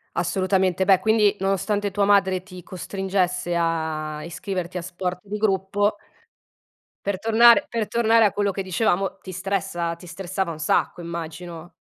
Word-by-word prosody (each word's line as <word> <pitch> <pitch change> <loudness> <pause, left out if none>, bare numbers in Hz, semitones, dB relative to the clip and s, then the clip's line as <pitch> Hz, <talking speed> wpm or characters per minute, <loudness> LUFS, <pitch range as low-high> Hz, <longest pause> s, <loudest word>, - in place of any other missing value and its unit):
Assolutamente. 185 +1 +1
Beh, 190 -2 +5
quindi, 215 -2 +3
nonostante 200 +1 0
tua 200 +1 0
madre 195 -2 +3
ti 185 -1 -12
costringesse 185 -1 -2
a 160 -2 -2
iscriverti 180 +1 -5
a 180 - -3
sport 180 +1 -4
di 210 +1 -5
gruppo 205 0 +1 1.1
per 200 -1 0
tornare 230 +6 +6
per 230 -3 -2
tornare 230 -1 +4
a 205 - +3
quello 205 -1 0
che 195 - -4
dicevamo, 190 0 0
ti 185 - -8
stressa 185 -2 -2
ti 170 - -14
stressava 185 +1 -3
un 155 - -8
sacco 155 +3 0
immagino. 170 0 -7
190 Hz, 145 wpm, -23 LUFS, 175-200 Hz, 1.1 s, tornare